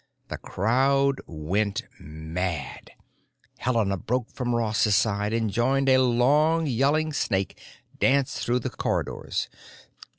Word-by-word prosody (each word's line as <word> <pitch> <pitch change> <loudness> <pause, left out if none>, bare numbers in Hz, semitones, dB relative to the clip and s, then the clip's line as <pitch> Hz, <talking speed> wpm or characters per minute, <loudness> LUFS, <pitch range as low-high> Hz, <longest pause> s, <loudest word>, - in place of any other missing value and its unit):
The - - -5
crowd 135 +6 +1
went 100 +8 -2 0.2
mad; 80 -1 -5 0.7
Helena 115 -6 0
broke 125 +5 -2
from 120 -2 -2
Ross's 110 -2 +2
side 105 -1 +1
and 115 -2 0
joined 135 +5 +1
a 130 0 +6
long 145 +7 +3
yelling 145 +4 +1
snake 95 -8 -1 0.4
dance 135 0 +2
through 125 +1 0
the - - -4
corridors. - - -2
120 Hz, 110 wpm, -25 LUFS, 100-135 Hz, 0.7 s, a